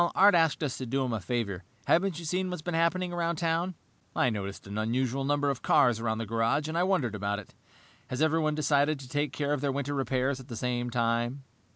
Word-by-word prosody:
"Art 200 Hz, +2 st, +7 dB
asked 165 Hz, -2 st, +3 dB
us 140 Hz, -4 st, -2 dB
to 130 Hz, -, -4 dB
do 135 Hz, +2 st, 0 dB
him 125 Hz, -, -2 dB
a 110 Hz, -, -1 dB
favor. 100 Hz, -2 st, -2 dB, 0.2 s
Haven't 180 Hz, -1 st, +2 dB
you 170 Hz, -, -7 dB
seen 185 Hz, +3 st, -1 dB
what's 180 Hz, -4 st, -5 dB
been 175 Hz, -, -3 dB
happening 175 Hz, +2 st, +1 dB
around 170 Hz, -1 st, 0 dB
town?" 170 Hz, +2 st, 0 dB, 0.4 s
"I 125 Hz, -, +3 dB
noticed 100 Hz, -2 st, -5 dB
an 100 Hz, +2 st, -4 dB
unusual 125 Hz, +4 st, 0 dB
number 145 Hz, 0 st, +1 dB
of 130 Hz, -, -5 dB
cars 120 Hz, -4 st, +4 dB
around 110 Hz, -1 st, -1 dB
the 115 Hz, -, -3 dB
garage, 115 Hz, +7 st, +1 dB
and 160 Hz, -, -4 dB
I 170 Hz, -, +2 dB
wondered 180 Hz, -, +1 dB
about 100 Hz, 0 st, -1 dB
it. 105 Hz, -, -10 dB, 0.5 s
Has 130 Hz, -, -4 dB
everyone 155 Hz, -1 st, +2 dB
decided 145 Hz, 0 st, +2 dB
to 130 Hz, -, -10 dB
take 145 Hz, +1 st, -1 dB
care 145 Hz, 0 st, -1 dB
of 145 Hz, -, -1 dB
their 140 Hz, -1 st, +1 dB
winter 140 Hz, +1 st, -2 dB
repairs 135 Hz, 0 st, 0 dB
at 130 Hz, -, -11 dB
the 120 Hz, -, -6 dB
same 120 Hz, +1 st, -1 dB
time?" 120 Hz, +3 st, 0 dB
135 Hz, 230 wpm, -29 LUFS, 120-160 Hz, 0.5 s, Art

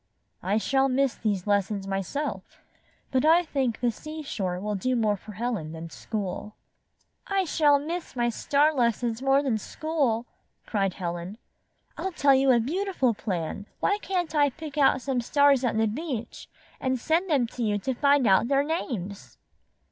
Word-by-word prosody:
''I 205 Hz, +4 st, +1 dB
shall 270 Hz, +4 st, +2 dB
miss 265 Hz, 0 st, +2 dB
these 205 Hz, -5 st, -2 dB
lessons 200 Hz, -1 st, 0 dB
myself, 195 Hz, -, -4 dB, 0.5 s
but 260 Hz, -2 st, +2 dB
I 330 Hz, +3 st, +5 dB
think 270 Hz, -7 st, -1 dB
the 240 Hz, -1 st, +2 dB
seashore 240 Hz, -, -4 dB
will 210 Hz, +2 st, -3 dB
do 250 Hz, +6 st, 0 dB
more 215 Hz, -3 st, +2 dB
for 210 Hz, +2 st, -11 dB
Helen 215 Hz, -8 st, -3 dB
than 165 Hz, 0 st, -8 dB
school." 210 Hz, -1 st, -5 dB, 0.7 s
''I 390 Hz, -1 st, +1 dB
shall 295 Hz, -3 st, +4 dB
miss 325 Hz, +3 st, -5 dB
my 240 Hz, -1 st, +1 dB
star 285 Hz, +6 st, +2 dB
lessons 235 Hz, -2 st, 0 dB
more 270 Hz, +1 st, +3 dB
than 240 Hz, -6 st, 0 dB
school," 270 Hz, -4 st, -1 dB, 0.4 s
cried 195 Hz, -4 st, -1 dB
Helen. 175 Hz, +2 st, -5 dB, 0.6 s
"I'll 380 Hz, -1 st, -3 dB
tell 285 Hz, -3 st, +4 dB
you 270 Hz, 0 st, +3 dB
a 245 Hz, -2 st, +6 dB
beauti 370 Hz, -, -2 dB
ful 255 Hz, -3 st, +3 dB
plan. 195 Hz, -1 st, -4 dB
Why 405 Hz, +1 st, +1 dB
can't 355 Hz, -4 st, -2 dB
I 290 Hz, -2 st, +4 dB
pick 305 Hz, +1 st, -9 dB
out 270 Hz, -3 st, +3 dB
some 265 Hz, -3 st, 0 dB
stars 280 Hz, +1 st, +4 dB
at 235 Hz, -3 st, 0 dB
the 220 Hz, -, +3 dB
beach 235 Hz, 0 st, -5 dB, 0.3 s
and 260 Hz, -1 st, -1 dB
send 335 Hz, +8 st, +1 dB
them 275 Hz, -6 st, +3 dB
to 245 Hz, -, -7 dB
you 210 Hz, -2 st, +1 dB
to 260 Hz, +6 st, -2 dB
find 280 Hz, +1 st, +3 dB
out 195 Hz, +3 st, +4 dB
their 275 Hz, +1 st, +3 dB
names?" 230 Hz, -, -4 dB
250 Hz, 170 wpm, -26 LUFS, 210-290 Hz, 0.7 s, a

